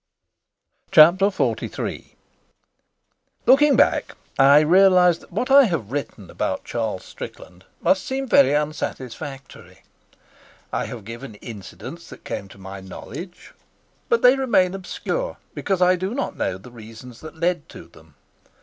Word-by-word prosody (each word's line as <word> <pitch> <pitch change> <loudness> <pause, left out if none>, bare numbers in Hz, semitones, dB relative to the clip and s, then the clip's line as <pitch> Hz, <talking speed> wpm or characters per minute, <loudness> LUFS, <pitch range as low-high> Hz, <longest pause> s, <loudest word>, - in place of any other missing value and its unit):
Chapter 185 +3 +6
XLIII 195 - -3 1.3
Looking 290 +2 +5
back, - - +2 0.2
I 140 +2 +7
realise 180 +1 +5
that - - -19
what 240 +8 -2
I 275 0 +8
have 155 - -3
written 125 -9 -5
about - - -3
Charles 110 -5 -3
Strickland 90 +1 -11 0.2
must 190 - +2
seem 270 0 -3
very 275 - +5
unsatisfactory. 140 -2 -6 0.9
I - - -1
have 115 -5 -9
given 115 +1 -9
incidents 105 -2 -10
that - - -13
came 100 - -5
to 95 - -16
my 95 0 -9
knowledge, 175 - -10 0.6
but 465 -1 +2
they 250 +2 +7
remain 230 -9 +2
obscure 195 - -4 0.2
because 190 -2 0
I 180 +1 +4
do 190 +6 -3
not 275 - -3
know 95 - -2
the 105 +6 -14
reasons 115 +1 -12
that 160 +1 -10
led 175 -1 -1
to - - -12
them. 80 -2 -20
155 Hz, 135 wpm, -22 LUFS, 115-195 Hz, 1.3 s, I